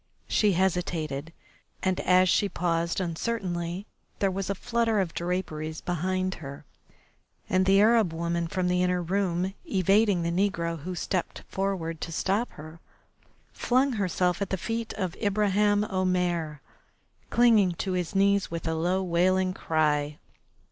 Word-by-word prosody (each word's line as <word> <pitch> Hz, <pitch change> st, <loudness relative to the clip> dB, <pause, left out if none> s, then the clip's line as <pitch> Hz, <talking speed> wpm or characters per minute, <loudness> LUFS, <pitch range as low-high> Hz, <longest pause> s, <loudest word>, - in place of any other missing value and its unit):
She 210 Hz, -2 st, +3 dB
hesitated, 165 Hz, -5 st, -1 dB, 0.5 s
and 185 Hz, -1 st, +1 dB
as 185 Hz, 0 st, +4 dB
she 200 Hz, +3 st, +2 dB
paused 170 Hz, -1 st, -1 dB
uncertainly, 175 Hz, 0 st, -3 dB, 0.3 s
there 195 Hz, -1 st, +1 dB
was 195 Hz, +1 st, -3 dB
a 200 Hz, -, 0 dB
flutter 230 Hz, 0 st, 0 dB
of 180 Hz, -4 st, -1 dB
draperies 160 Hz, -3 st, -3 dB
behind 185 Hz, +2 st, -1 dB
her, 140 Hz, -1 st, -8 dB, 0.8 s
and 185 Hz, 0 st, +2 dB
the 195 Hz, +1 st, +5 dB
Arab 220 Hz, -3 st, +4 dB
woman 170 Hz, +1 st, -2 dB
from 180 Hz, +3 st, -1 dB
the 180 Hz, 0 st, +2 dB
inner 180 Hz, -1 st, +1 dB
room, 185 Hz, 0 st, 0 dB
evading 195 Hz, 0 st, +2 dB
the 170 Hz, -, 0 dB
negro 170 Hz, -3 st, 0 dB
who 180 Hz, +4 st, -5 dB
stepped 180 Hz, 0 st, -3 dB
forward 180 Hz, -5 st, -2 dB
to 165 Hz, -, -4 dB
stop 200 Hz, +8 st, 0 dB
her, 155 Hz, +2 st, -11 dB, 0.7 s
flung 260 Hz, +3 st, +2 dB
herself 180 Hz, -3 st, 0 dB
at 200 Hz, -, -1 dB
the 190 Hz, -, -1 dB
feet 225 Hz, +3 st, -3 dB
of 185 Hz, -3 st, -3 dB
Ibraheim 205 Hz, 0 st, +2 dB
Omair, 180 Hz, -6 st, -1 dB, 0.7 s
clinging 225 Hz, -6 st, +4 dB
to 190 Hz, +3 st, -3 dB
his 180 Hz, 0 st, -2 dB
knees 200 Hz, 0 st, +3 dB
with 165 Hz, 0 st, -4 dB
a 160 Hz, -, 0 dB
low 180 Hz, +4 st, 0 dB
wailing 185 Hz, +1 st, +2 dB
cry. 150 Hz, -3 st, 0 dB
185 Hz, 140 wpm, -27 LUFS, 170-195 Hz, 0.8 s, the